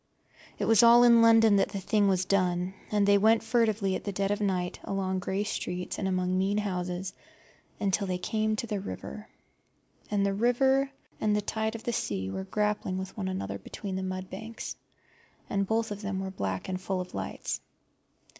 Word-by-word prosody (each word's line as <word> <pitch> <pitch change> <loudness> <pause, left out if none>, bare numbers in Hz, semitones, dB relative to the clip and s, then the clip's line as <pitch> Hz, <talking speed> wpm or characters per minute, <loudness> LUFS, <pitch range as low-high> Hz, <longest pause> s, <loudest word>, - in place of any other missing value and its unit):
It - - -1
was 225 -3 +6
all 235 +1 +8
in 235 -1 +7
London 225 -2 +6
that 195 - +2
the 200 - -4
thing 205 +1 +2
was 185 -1 +2
done, 180 -1 +1 0.2
and 205 -1 +2
they 200 0 +6
went 220 +2 +4
furtively 220 -4 +1
at 200 0 -4
dead 195 +1 0
of 205 +1 -1
night 185 -3 -1
along 190 -1 -1
grey 190 +2 -1
streets 180 -3 -4
and 190 - -1
among 185 -1 0
mean 195 +2 +1
houses 180 -2 -2 0.7
until 200 0 0
they 180 -1 -1
came 215 +3 0
to 215 - -3
the 210 -3 -2
river. 210 +2 -7 0.8
And 200 -1 +1
the 200 - +1
river 265 +5 +3 0.3
and 210 -1 +2
the 210 - +1
tide 220 +2 -2
of 225 - -7
the 240 - -2
sea 95 - -2
were 95 0 -4
grappling 210 - -1
with 190 0 -6
one 195 -3 -3
another 100 - -3
between 190 - -6
the 190 - -2
mud 185 0 -4
banks, 220 +5 -7 0.7
and 200 -1 0
both 225 +1 0
of 205 0 -5
them 200 -2 -3
were 190 0 -4
black 95 - -3
and 185 -1 -3
full 190 0 -2
of 180 - -6
lights. 95 -1 -4
200 Hz, 190 wpm, -29 LUFS, 185-215 Hz, 0.8 s, all